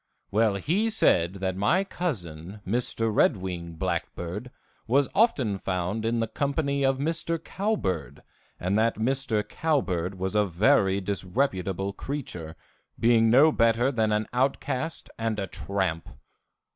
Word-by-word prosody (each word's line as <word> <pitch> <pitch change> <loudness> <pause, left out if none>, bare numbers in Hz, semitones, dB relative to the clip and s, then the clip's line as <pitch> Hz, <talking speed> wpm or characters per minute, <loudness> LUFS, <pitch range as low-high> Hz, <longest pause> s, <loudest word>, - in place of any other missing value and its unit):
Well, 105 0 +3
he 185 - +1
said 90 - +3
that 95 -1 -2
my 105 - +2
cousin, 100 - -5
Mr. 115 +1 0
Red - - +4
Wing 90 -3 -5
Blackbird, 90 +7 -3 0.4
was 135 +3 +3
often 135 - +2
found 95 +4 -2
in 115 +1 +1
the 115 - 0
company 140 +3 -1
of 135 0 +2
Mr. 165 +3 -1
Cowbird, 165 - -2 0.4
and 95 +4 +1
that 115 +1 +2
Mr. 115 -3 0
Cowbird 100 - -1
was 95 +1 -2
a 105 0 +4
very 100 +1 +3
disreputable 95 -1 -1
creature, 95 - -5 0.4
being 115 -1 +4
no 140 +7 +6
better 115 +1 +3
than 110 -4 +1
an 105 +1 +1
outcast 135 +4 -1
and 115 -1 -1
a 100 - -1
tramp. 95 -3 -3
110 Hz, 135 wpm, -27 LUFS, 95-135 Hz, 0.4 s, no